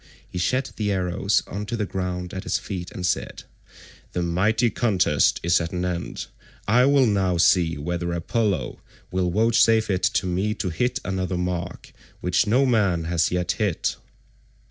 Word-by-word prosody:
He 90 - -6
shed 130 +9 0
the 105 -2 0
arrows 95 +1 0
on 105 +1 -6
to 115 - -3
the 105 - -1
ground 90 -2 -4
at 95 - -4
his - - 0
feet 90 -3 -6
and 90 - -5
said, 90 - -2 0.7
"The 90 - -1
mighty 105 +7 +1
contest 95 - +2
is 85 0 +3
at 85 +1 -4
an 90 0 -1
end. 90 -1 -4 0.4
I 120 +5 +5
will 140 -2 +5
now 95 -5 +1
see 85 -1 +3
whether 85 +3 -3
Apollo 90 - -1 0.3
will 90 -1 0
vouchsafe 110 +2 +3
it 95 -1 0
to 95 +1 +1
me 95 +4 -1
to 95 - -2
hit 125 +9 0
another 95 -1 -2
mark 90 0 -4 0.3
which 90 +4 +1
no 125 +6 +3
man 100 -9 +2
has 85 0 +1
yet 90 -1 0
hit." 105 -6 -1
95 Hz, 165 wpm, -24 LUFS, 90-105 Hz, 0.7 s, I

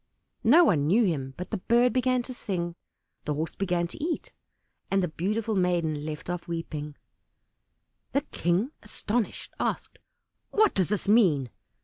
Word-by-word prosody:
No 300 +10 +7
one 150 - +3
knew 215 +9 +4
him, 135 -7 -2
but 180 - -6
the 215 - -1
Bird 240 +5 +3
began 255 -1 +2
to 255 - -6
sing, 175 -7 -3 0.5
the 150 - -1
Horse 160 +2 -2
began 175 -3 0
to 295 - -7
eat, 330 0 -2 0.6
and 195 -1 +2
the - - +1
beautiful 210 +7 -1
maiden 170 -5 +1
left 150 -1 -6
off 175 0 -4
weeping. 155 -3 -4 1.2
The 280 - +3
King, 195 - 0
astonished, 215 +1 -3
asked, - - -2 0.5
"What 430 -1 +3
does 185 -3 +1
this 210 -1 -1
mean?" 170 - +4
185 Hz, 150 wpm, -27 LUFS, 165-235 Hz, 1.2 s, No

